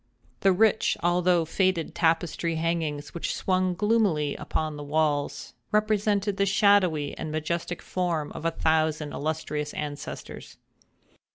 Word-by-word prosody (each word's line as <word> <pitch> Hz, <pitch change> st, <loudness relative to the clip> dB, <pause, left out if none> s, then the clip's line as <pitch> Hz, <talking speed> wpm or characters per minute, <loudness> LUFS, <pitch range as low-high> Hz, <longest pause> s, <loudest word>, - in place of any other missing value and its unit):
The 195 Hz, -, +4 dB
rich 215 Hz, +3 st, +3 dB
although 175 Hz, -1 st, +3 dB
faded 185 Hz, 0 st, 0 dB
tapestry 165 Hz, 0 st, +1 dB
hangings 160 Hz, -3 st, -2 dB
which 170 Hz, -, -3 dB
swung 185 Hz, -1 st, 0 dB
gloomily 200 Hz, -8 st, +1 dB
upon 155 Hz, -1 st, -3 dB
the 145 Hz, -, -7 dB
walls, 145 Hz, -1 st, -1 dB, 0.2 s
represented 210 Hz, -1 st, +1 dB
the 200 Hz, -, +3 dB
shadowy 190 Hz, -7 st, +3 dB
and 155 Hz, -, -4 dB
majestic 170 Hz, +3 st, -3 dB
forms 170 Hz, -5 st, -2 dB
of -, -, -7 dB
a 165 Hz, -, +2 dB
thousand 160 Hz, -2 st, 0 dB
illustrious 150 Hz, -1 st, -3 dB
ancestors. 145 Hz, -1 st, -7 dB
165 Hz, 120 wpm, -26 LUFS, 155-185 Hz, 0.2 s, The